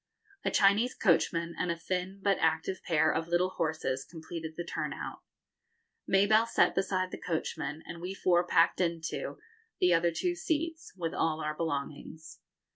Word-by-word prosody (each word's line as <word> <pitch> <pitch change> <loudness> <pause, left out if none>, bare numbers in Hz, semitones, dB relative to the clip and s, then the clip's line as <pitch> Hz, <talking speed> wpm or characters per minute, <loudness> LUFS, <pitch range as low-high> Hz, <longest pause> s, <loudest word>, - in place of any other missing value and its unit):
A - - +1
Chinese 210 +6 +3
coachman 170 -2 +2
and 180 - 0
a 170 - +1
thin 185 +3 -3
but 200 -2 +2
active 160 +4 0
pair 165 -4 +2
of 165 0 -1
little 175 +2 +2
horses 155 -6 -1
completed 160 -1 -7
the 175 - -2
turn - - -3
out. - - -6 0.9
Mabelle 215 +4 +4
sat - - +3
beside 185 0 0
the - - -7
coachman, 160 -2 -3
and 170 - -8
we 185 +2 -4
four 175 -2 +3
packed 170 0 +3
into, 170 -2 -2 0.4
the 180 -1 +4
other 170 0 +3
two 350 - -1
seats, 330 -2 -2
with 165 -2 -2
all 160 -1 0
our 150 -1 -2
belongings. 155 0 -5
170 Hz, 160 wpm, -30 LUFS, 160-190 Hz, 0.9 s, Mabelle